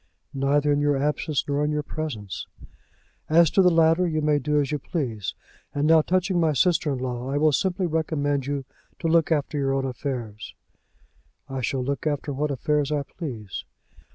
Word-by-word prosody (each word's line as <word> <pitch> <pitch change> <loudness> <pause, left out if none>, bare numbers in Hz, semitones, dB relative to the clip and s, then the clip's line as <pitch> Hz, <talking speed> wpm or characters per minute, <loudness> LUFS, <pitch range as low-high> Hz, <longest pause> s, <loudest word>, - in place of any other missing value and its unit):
"Neither 145 +2 +2
in 145 - +2
your 145 -1 +2
absence 150 +1 -1
nor 145 0 0
in 150 - +1
your 150 0 -1
presence." 130 -13 -5 0.8
"As 165 0 +5
to 195 - +4
the 180 - +6
latter 165 +1 +4
you 155 -2 0
may 150 -1 +2
do 150 +2 +1
as 140 -1 0
you 150 - -1
please. 120 - -3 0.4
And 145 +1 +1
now 160 0 +6
touching 185 +2 +1
my 160 -2 +3
sister 165 +1 +2
in 135 - -1
law, 125 0 -4
I 140 - 0
will 155 +1 +4
simply 185 +4 0
recommend 145 -4 -1
you 140 -2 -2 0.3
to 165 - -2
look 165 0 +3
after 150 -1 0
your 135 -1 +1
own 135 0 0
affairs." 120 -4 -5 0.9
"I 135 -1 -4
shall 130 +1 -1
look 140 +3 -2
after 145 -1 -2
what 150 +3 -1
affairs 145 +2 0
I 145 -1 0
please." 120 - -6
145 Hz, 185 wpm, -25 LUFS, 135-155 Hz, 0.9 s, the